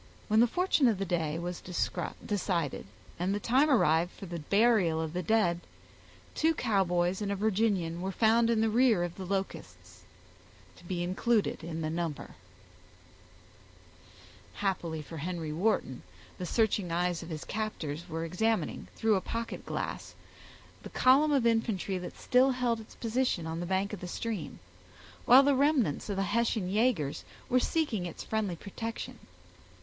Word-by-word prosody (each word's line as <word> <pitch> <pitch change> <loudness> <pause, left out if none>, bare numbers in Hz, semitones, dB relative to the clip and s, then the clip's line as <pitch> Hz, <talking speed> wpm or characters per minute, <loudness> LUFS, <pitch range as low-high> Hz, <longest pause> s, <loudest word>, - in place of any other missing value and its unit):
When 215 +1 +4
the 240 - +6
fortune 350 -1 +2
of 220 -4 +2
the 195 - -2
day 165 -3 -1
was 175 +1 -5
decided, 175 - -2 0.3
and 185 +3 0
the - - -1
time 260 +8 +3
arrived 170 - +3
for - - -10
the 170 -2 -5
burial 200 -1 +3
of 160 -1 -3
the 180 - -1
dead, 180 -3 +2 0.7
two 320 +1 +2
Cowboys 185 -5 +1
and 200 -1 -1
a - - 0
Virginian 195 -5 0
were 190 +1 -2
found 230 +3 +3
in 225 -2 +2
the 225 - +2
rear 230 -5 +4
of 175 -1 -3
the 185 -1 -7
Locusts, 195 0 -5 0.8
to - - -16
be 175 -1 -2
included 200 +3 0
in 165 0 -4
the 155 - -1
number. 165 -3 -4 2.2
Happily 170 -6 -2
for 165 +2 -9
Henry 165 -1 -4
Wharton, 165 - 0 0.4
the 180 - -3
searching 205 -5 +1
eyes 175 0 0
of 165 - -9
his 155 -2 -5
captors 170 -8 -4
were 165 +1 -3
examining, 220 +7 -1
through 220 -1 +2
a - - -2
pocket 230 +3 -5
glass, - - -4 0.7
the - - -9
column 275 +4 +4
of 275 -5 +2
infantry 225 -5 +1
that 180 - -8
still 255 +2 +3
held 250 -3 0
its 220 - -13
position 230 -6 -1
on 165 0 -4
the 175 - -4
bank 190 +2 0
of 205 - -5
the 180 - -6
stream, 220 +2 -4 0.7
while 260 +3 +8
the 285 0 +4
remnants 265 - +1
of 200 - -1
the 195 - 0
Hessian 220 -1 0
yagers 210 - +1 0.3
were 255 -1 +4
seeking 245 - 0
its 170 - -8
friendly 215 -5 -1
protection. 225 +6 -6
195 Hz, 160 wpm, -30 LUFS, 175-230 Hz, 2.2 s, while